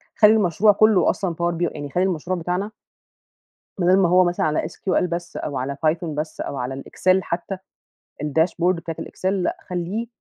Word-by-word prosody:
خلّي 210 -1 +7
المشروع 210 0 +4
كلّه 215 -1 +4
أصلًا 180 -4 -1
Power 170 0 -1
B 175 -1 0
يعني 145 -1 -5
خلّي 180 +6 +1
المشروع 185 0 -1
بتاعنا 180 +5 -2 1.1
بدل 180 +1 +4
ما 185 -3 +3
هو 180 +1 +6
مثلًا 175 -2 0
على 155 -1 +1
SQL 185 +2 -1
بس 175 0 -5
أو 145 - -4
على 135 +2 -3
Python 165 +2 +1
بس 155 0 -4
أو 140 - -4
على 130 +1 -3
الExel 185 +1 +1
حتّى، 180 +2 -4 0.7
الdashboard 165 +4 +1
بتاعة 165 -1 -6
الExel - - -7
لأ، 190 -3 -1
خلّيه 180 +6 -3
175 Hz, 175 wpm, -22 LUFS, 160-185 Hz, 1.1 s, خلّي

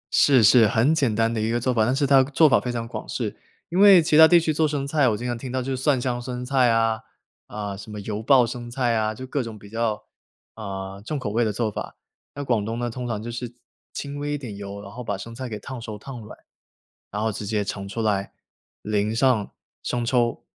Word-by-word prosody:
是， 135 -5 +5
是， 110 +1 +7
很 115 +9 +3
简 135 -9 +1
单 115 +1 +1
的 110 - -1
一 110 - 0
个 120 +1 0
做 125 +2 0
法， 110 -2 +2
但 125 +3 +1
是 140 +1 +1
它 135 -1 +6
做 145 +4 +4
法 140 - +4
非 125 - -4
常 115 -1 -4
广 - - -7
式， - - -3 0.3
因 175 - -1
为 200 -2 +9
其 160 -1 +1
它 160 +1 +9
地 175 +1 +6
区 160 -1 0
做 155 +1 +2
生 145 -2 -2
菜， 140 -1 +2
我 105 - -1
经 120 - -6
常 120 -1 -1
听 125 +2 -7
到 130 - -1
就 130 +1 -2
是 130 - -6
蒜 135 -1 +2
香 120 -1 -2
生 125 0 -5
菜 130 -2 +3
啊， 115 -1 +2 0.5
啊， 105 -2 -5
什 100 +2 -10
么 105 - -6
油 105 +1 -4
爆 125 +1 +5
生 120 0 -6
菜 120 -1 0
啊， 110 -1 0
就 130 - -7
各 135 +2 -2
种 115 -3 -7
比 100 0 -14
较， 115 -2 -1 0.5
啊， 95 -2 -7
重 150 +8 -4
口 110 -7 -4
味 115 +3 +1
的 110 - 0
做 110 +1 -1
法。 - - -6 0.4
那 145 - -4
广 120 -6 0
东 115 +2 -4
呢， 120 0 -2
通 125 +1 -5
常 110 -3 -3
就 120 - -5
是 120 0 -6 0.4
轻 145 0 -6
微 145 0 -2
一 - - -1
点 120 -8 -8
油， 100 0 -7
然 100 - -10
后 125 +3 -8
把 100 -4 -3
生 115 +4 -8
菜 130 +1 -6
给 110 - -5
烫 125 +4 -8
熟 110 -2 -6
儿、 - - -9
烫 125 +3 -9
软， 105 - -11 0.7
然 105 +1 -3
后 110 - +1
直 105 0 -6
接 105 0 0
盛 100 0 -5
出 115 +3 -4
来， 100 -2 0 0.5
淋 105 +1 0
上 120 -4 +2 0.3
生 120 -1 -2
抽。 120 -1 +1
120 Hz, 275 characters per minute, -24 LUFS, 110-130 Hz, 0.7 s, 为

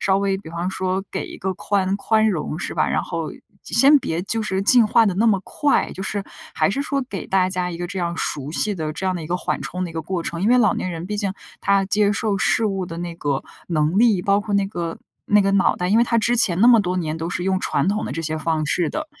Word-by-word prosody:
稍 195 0 +2
微， 195 -1 0
比 190 - -11
方 170 +2 -3
说 190 0 -1
给 - - -3
一 - - -9
个 190 0 -2
宽 195 0 0
宽 220 +1 +2
容 160 -4 -2
是 - - -4
吧。” - - +1
然 - - 0
后 - - -4 0.3
先 285 +2 +5
别 165 -6 -2
就 225 +3 -1
是 190 -2 -1
进 240 +2 +6
化 225 +1 +4
得 190 - 0
那 215 +5 +2
么 200 -3 +2
快， 290 -1 0
就 190 - -6
是 200 0 -3 0.3
还 - - +2
是 280 +7 -1
说 280 -1 -1
给 195 - -5
大 185 -1 +2
家 180 -1 -2
一 170 - -6
个， 175 - -3
这 190 +1 -6
样 170 -1 -2
熟 145 -1 -3
悉 205 +5 -1
的 155 -3 -3
这 190 +4 -4
样 185 - 0
的 170 - -4
一 - - -7
个 180 - 0
缓 - - -2
冲 180 0 -4
的 175 - -5
一 - - -11
个 160 - -4
过 175 +1 -3
程。 170 +2 -4
因 210 - +2
为 250 +1 +5
老 215 -4 +3
年 185 - -3
人， 170 +1 -6
毕 210 +1 -3
竟 200 -2 -1 0.3
他 195 -1 +2
接 205 +1 +2
受 205 -1 -1
事 225 +2 +2
物 195 -2 -2
的 165 - -7
那 175 -1 -5
个 145 -4 -2 0.2
能 155 +1 +1
力， 220 -6 +4
包 200 0 +2
括 205 0 -3
那 200 -1 +2
个 170 -4 -5 0.3
那 210 0 +4
个 195 - +1
脑 195 -1 +3
袋， 180 - -2
因 215 +4 +4
为 - - +5
他 230 0 +1
之 240 +2 +2
前 180 -6 +2
那 235 - +6
么 235 -3 +7
多 180 -1 -2
年， 160 -3 -2
都 165 +1 -4
是 180 - -3
用 190 0 +1
传 - - 0
统 210 +2 0
的 - - -5
这 165 - -4
些 155 0 -2
方 155 -1 -1
式 170 +1 +1
的。 310 0 -4
190 Hz, 305 characters per minute, -21 LUFS, 170-205 Hz, 0.3 s, 么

